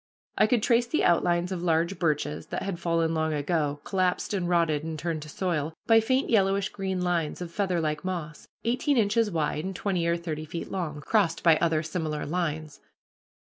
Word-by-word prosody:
I - - +4
could 225 -1 +2
trace 235 -1 +3
the 310 - 0
outlines 175 +1 +2
of 180 -2 -3
large 170 +2 +1
birches 150 -2 -1
that - - -4
had 190 -4 -3
fallen 165 -1 +1
long 160 -1 0
ago, 145 -1 -1
collapsed 185 0 0
and 180 -3 -1
rotted 165 -4 +2
and 160 0 -4
turned 160 0 -3
to 150 - -9
soil, 160 -3 -2
by 225 -1 +6
faint 260 +4 +1
yellowish 195 -2 +2
green 190 -2 -3
lines 170 -4 -1
of 175 -2 -6
featherlike 170 -6 -1
moss, 170 -5 -5 0.2
eighteen 250 +4 +1
inches 220 0 +3
wide 155 -3 -1
and 190 +1 -4
twenty 180 -3 -1
or 170 0 +2
thirty 155 -2 -5
feet 165 +2 -6
long, 155 -6 -3
crossed 190 -1 +1
by 165 -2 +6
other 160 -1 +1
similar 155 -2 -3
lines. 155 -2 -3
170 Hz, 185 wpm, -27 LUFS, 155-190 Hz, 0.2 s, by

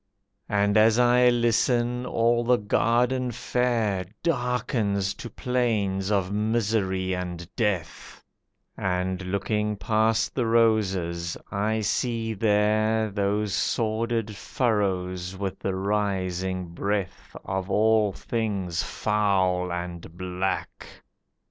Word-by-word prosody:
And 100 +1 +2
as 110 +1 +5
I 125 0 +5
listen, 120 +1 +1
all 120 0 +2
the 125 +1 +3
garden 120 +4 +1
fair 115 -5 0 0.2
Darkens 120 - 0
to 120 +4 -8
plains 105 -6 -1
of 95 -2 +1
misery 105 -3 0
and 90 -2 -5
death, 105 -8 -3 0.5
And, 90 0 -1
looking 105 +3 -1
past 110 +1 +1
the 125 -3 0
roses, 95 -7 +1
I 110 +2 0
see 115 +1 -1
there 110 +1 +2
Those 100 0 0
sordid 110 0 -1
furrows 95 -6 -1
with 95 -1 -4
the 95 - -2
rising 95 -2 -1
breath 100 +2 -3
Of 95 0 -3
all 110 0 +3
things 100 -6 -2
foul 95 -4 0
and 85 -1 -6
black. 95 +1 -3
105 Hz, 100 wpm, -26 LUFS, 95-115 Hz, 0.5 s, as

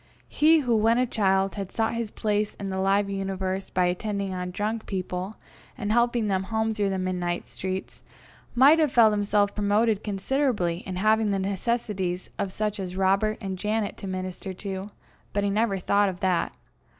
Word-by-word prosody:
He 315 +1 +4
who 245 -4 +1
when 225 +2 +3
a 250 - +3
child 195 -4 +1
had 195 -3 -5
sought 225 0 0
his 230 -2 -2
place 210 0 -1
in 195 -1 -5
the 190 - -2
live 195 +1 +2
universe 195 -1 -3
by 180 -1 +1
attending 200 +2 -2
on 180 0 -3
drunk 215 +4 -3
people 185 +1 -3 0.4
and 210 -4 -2
helping 235 0 +2
them 190 -2 0
home 220 +1 0
through 205 -2 0
the 190 - -1
midnight 180 -2 -2
streets, 190 0 -5 0.5
might 280 +6 +7
have 305 -4 +3
felt 230 -3 +6
himself 205 0 +1
promoted 210 +1 +1
considerably 205 -3 0
in 185 - -4
having 215 +3 +3
the 200 - +1
necessities 195 -2 -2
of 195 - -1
such 210 +1 -2
as 185 -1 -4
Robert 195 +3 +2
and 190 -2 -4
Janet 210 +1 -1
to 195 - -7
minister 185 0 -4
to, 195 +1 -5 0.4
but 205 - 0
he 200 - +1
never 210 -1 +1
thought 200 +2 +2
of 180 -1 -7
that. 185 -2 +1
200 Hz, 180 wpm, -26 LUFS, 190-220 Hz, 0.5 s, might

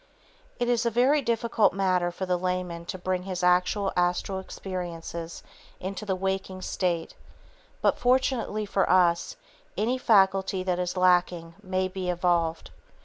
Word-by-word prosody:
It 240 - 0
is 240 -1 +2
a 235 - +2
very 255 +6 +3
difficult 235 -2 +1
matter 185 -2 +1
for 180 +2 -5
the 180 -1 +1
layman 180 -2 -3
to 185 - -5
bring 185 0 -2
his 185 -1 -5
actual 180 +3 +2
astral 180 +2 0
experiences 170 -3 -6 0.4
into 195 +3 -5
the 190 - +1
waking 190 0 -3
state 170 -3 -2 0.7
(but - - +2
fortunately 245 -4 +1
for 195 -1 0
us) 175 -2 +3 0.4
any 235 +6 0
faculty 195 -4 +3
that 180 -1 -1
is 180 +1 -2
lacking 175 -2 +2
may 185 -1 -1
be 185 -1 -4
evolved. 170 -2 0
185 Hz, 145 wpm, -27 LUFS, 180-200 Hz, 0.7 s, very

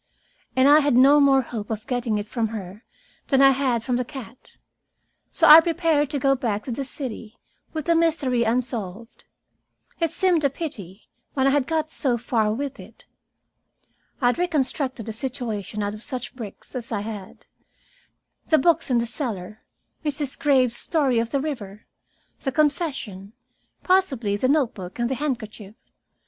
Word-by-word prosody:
And 260 +1 +5
I 295 +2 +8
had 285 -4 +2
no 275 +4 +7
more 270 -2 +4
hope 225 -3 -6
of 220 -1 -4
getting 245 -4 -1
it 205 - -3
from 225 +1 -2
her 210 0 -8 0.4
than 270 - +3
I 270 0 +7
had 255 -4 0
from 250 -1 0
the 250 - 0
cat. 250 -2 -11 0.7
So 330 - +1
I 305 +2 +12
prepared 325 -3 +1
to 295 - -2
go 275 0 +3
back 225 -6 -2
to 255 - -5
the 275 +4 -3
city, 240 -4 -7 0.3
with 310 -2 -4
the 335 - +3
mystery 310 -7 +1
unsolved. 230 -2 -3 0.7
It 330 -1 +1
seemed 345 -1 +1
a 280 - +4
pity, 225 - -8 0.3
when 265 -1 +2
I 275 - +4
had 280 -2 +1
got 315 -1 -1
so 255 -5 0
far 220 -2 0
with 275 +4 -4
it. - - -14 1.2
I - - +1
had 245 - -1
reconstructed 270 - -1
a 220 - -4
situation 220 -5 -4
out 205 0 -2
of 215 - -9
such 255 +2 -5
bricks 220 -6 -9
as 245 -2 -5
I 210 -3 -1
had, 205 -3 -8 1.0
the 315 - +4
books 330 +2 +2
in 250 - +3
the 235 - +1
cellar, 220 - -5 0.4
Mrs. 290 -2 -2
Graves's 255 -5 +3
story 275 -7 +1
of 230 0 -1
the 280 - 0
river, 225 -9 -6 0.5
the 270 - -2
confession, 270 - -1 0.5
possibly 275 - +2
the 255 +5 0
note 275 -5 +2
book 185 -3 -9
and 240 +1 -1
the 265 - -3
handkerchief. 220 -7 -4
255 Hz, 170 wpm, -23 LUFS, 220-290 Hz, 1.2 s, I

